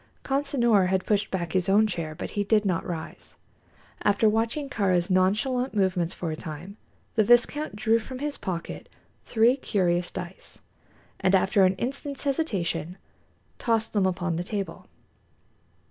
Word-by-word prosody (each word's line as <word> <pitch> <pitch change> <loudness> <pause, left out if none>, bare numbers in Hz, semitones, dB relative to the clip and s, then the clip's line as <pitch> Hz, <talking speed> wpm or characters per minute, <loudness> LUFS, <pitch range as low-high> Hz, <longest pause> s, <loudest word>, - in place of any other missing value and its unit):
Consinor 250 -8 +2
had 190 0 0
pushed 205 -1 +1
back 170 -4 -3
his 185 0 +1
own 210 +3 +5
chair, 165 -7 -3
but - - -6
he 205 - -1
did 210 +1 +2
not 180 -4 0
rise. 165 -3 -7 0.7
After 205 +2 +3
watching 230 +7 0
Kāra's 190 -8 +1
nonchalant 215 +8 +1
movements 185 -3 +1
for 170 -3 -3
a - - -3
time, 165 +4 -8 0.4
the 220 - +3
viscount 240 +5 +3
drew 220 +2 +2
from 255 +3 -8
his 290 +2 -3
pocket 175 -3 -5 0.4
three 235 +2 +4
curious 180 -9 0
dice, 180 +1 -8 0.6
and 190 +1 +3
after 190 +1 +4
an 185 +1 +2
instant's 275 +5 -4
hesitation 185 - -1 0.6
tossed 225 -2 0
them 200 -3 +3
upon 175 -2 -1
the 175 - -2
table. 200 +1 -5
200 Hz, 145 wpm, -26 LUFS, 180-230 Hz, 0.7 s, own